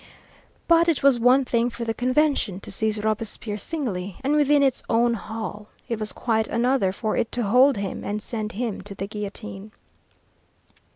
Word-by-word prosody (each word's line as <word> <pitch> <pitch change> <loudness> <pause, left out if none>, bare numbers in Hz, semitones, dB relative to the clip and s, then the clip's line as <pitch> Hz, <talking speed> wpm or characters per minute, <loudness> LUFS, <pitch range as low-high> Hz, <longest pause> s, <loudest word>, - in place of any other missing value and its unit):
But 335 0 +5
it 320 - 0
was 275 -3 +5
one 255 +3 +5
thing 235 0 +1
for 235 -1 -6
the 225 - -1
Convention 255 -6 +1
to - - -10
seize 215 +1 -1
Robespierre 215 -1 -2
singly, 200 - -3
and 285 +3 +2
within 290 -1 +4
its 270 -2 +1
own 235 +1 +3
hall; 215 -1 -6 0.2
it 230 -2 -3
was 215 -1 -2
quite 220 -2 0
another 240 -5 +1
for 215 +3 -2
it 230 - -1
to 245 - 0
hold 250 +5 +5
him 195 -1 -4
and 205 +1 -2
send 215 -1 -5
him 225 -1 -3
to 200 +1 -9
the 195 - -4
guillotine. 210 0 -7
225 Hz, 175 wpm, -24 LUFS, 210-255 Hz, 0.2 s, But